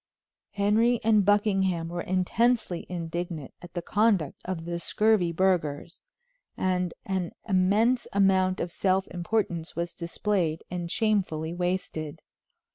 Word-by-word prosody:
Henry 220 +4 +3
and 215 -2 +4
Buckingham 195 -4 +2
were 175 +1 -4
intensely 185 +2 +1
indignant 170 -3 -4
at 175 0 -12
the 175 - -3
conduct 205 -7 +1
of 180 -3 -4
the 170 0 -3
scurvy 210 -2 +2
burghers, 170 -3 0 0.6
and 180 -1 0
an 190 -3 -2
immense 205 +6 +2
amount 190 -1 +3
of 170 - -3
self 190 +1 +1
importance 175 -2 -2
was 170 0 -3
displayed 170 -1 -1
and 175 -1 -3
shamefully 180 -7 0
wasted. 175 -4 -3
185 Hz, 120 wpm, -27 LUFS, 170-205 Hz, 0.6 s, and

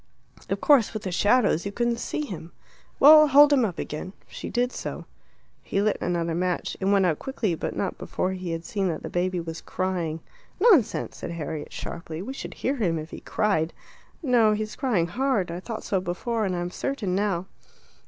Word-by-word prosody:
"Of - - -1
course 265 -8 +4
with 215 - -4
the 185 - -3
shadows 205 -2 +3
you 200 - -4
couldn't 235 +2 0
see 300 - -3
him." 170 - -8 0.5
"Well, 305 +2 +9
hold 290 +1 +7
him 265 -3 +4
up 195 -6 -2
again." 165 +5 -5
She - - -7
did 245 +1 0
so. - - -6 0.6
He 195 - -2
lit 210 0 +1
another 170 -1 -1
match. 180 +1 -1
It 190 - -2
went 195 -1 +4
out 160 -4 +1
quickly, 250 -8 -2
but 160 - -4
not 195 - -2
before 185 - -2
he 185 -1 -5
had 165 0 -4
seen 195 +1 -1
that 160 -3 -3
the - - -6
baby 180 +1 0
was 165 -1 -6
crying. 175 -4 -2 0.4
"Nonsense," 365 - +3
said - - -6
Harriet 155 -2 -5
sharply. 165 -1 -6
"We 260 - -5
should - - -7
hear 275 +2 -1
him 175 -8 +1
if 155 +1 -7
he - - -7
cried." 170 -7 0 0.5
"No, 235 -6 +4
he's 215 0 -3
crying 230 -11 +1
hard; 215 -2 0
I 170 - -4
thought 220 +4 -6
so 190 -2 0
before, 215 +5 -2
and 185 -2 -1
I'm 175 0 -3
certain 220 -8 -2
now." 190 -2 0
195 Hz, 195 wpm, -26 LUFS, 175-235 Hz, 0.6 s, Well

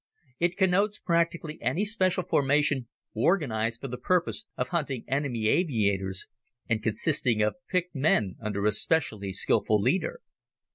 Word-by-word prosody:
It 175 +1 0
connotes 200 +2 +2
practically 170 -2 -1
any 135 - 0
special 185 -4 0
formation 145 -3 +1 0.3
organized 115 - 0
for 135 - -4
the 125 -1 -6
purpose 180 +3 0
of - - -2
hunting 140 -8 -2
enemy 130 -5 -1
aviators, 100 - 0 0.4
and 115 -2 0
consisting 115 0 +2
of 105 - +1 0.2
picked 180 -1 -1
men 130 - +1
under 105 -2 -2
a 105 - +4
specially 105 - -1
skilful 105 +2 +2
leader. 190 - 0
140 Hz, 135 wpm, -27 LUFS, 110-175 Hz, 0.4 s, a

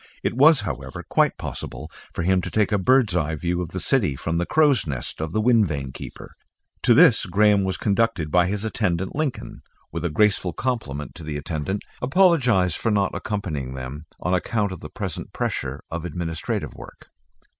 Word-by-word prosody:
It - - 0
was, 145 +1 +6
however, 65 -9 -5
quite - - +2
possible 75 +6 -6 0.2
for 85 - -3
him 95 +1 +3
to - - -5
take 105 -2 +1
a 105 - +2
bird's 120 -1 +3
eye 80 -2 0
view 85 +3 -1
of 85 - -4
the 95 - -4
city 100 - +1
from 80 +5 -2
the 85 - -1
crow's 145 - +3
nest 65 +1 -4
of 80 0 -3
the 110 - 0
wind 115 -3 +4
vane 70 -4 -4
keeper. - - -10 0.5
To - - +5
this - - +6
accordingly - - -7 0.3
Graham - - 0
was 95 - -1
conducted 100 -7 0
by 90 +1 +4
his 100 +2 -2
attendant. 95 -5 -1
Lincoln; 150 -3 -3 0.3
with 85 - -4
a 85 - 0
graceful 95 0 +2
compliment 75 - -3
to 85 - -10
the 75 -1 -4
attendant, 80 +6 -3 0.2
apologised 125 - +3
for 115 - 0
not 100 -3 +1
accompanying 75 - -3
them, 65 +4 -7
on 90 - -1
account 100 +2 0
of 95 - -6
the - - -9
present - - -6
pressure 70 +1 -3
of 85 0 -4
administrative 80 -2 -3
work. - - -13
90 Hz, 190 wpm, -23 LUFS, 80-110 Hz, 0.5 s, was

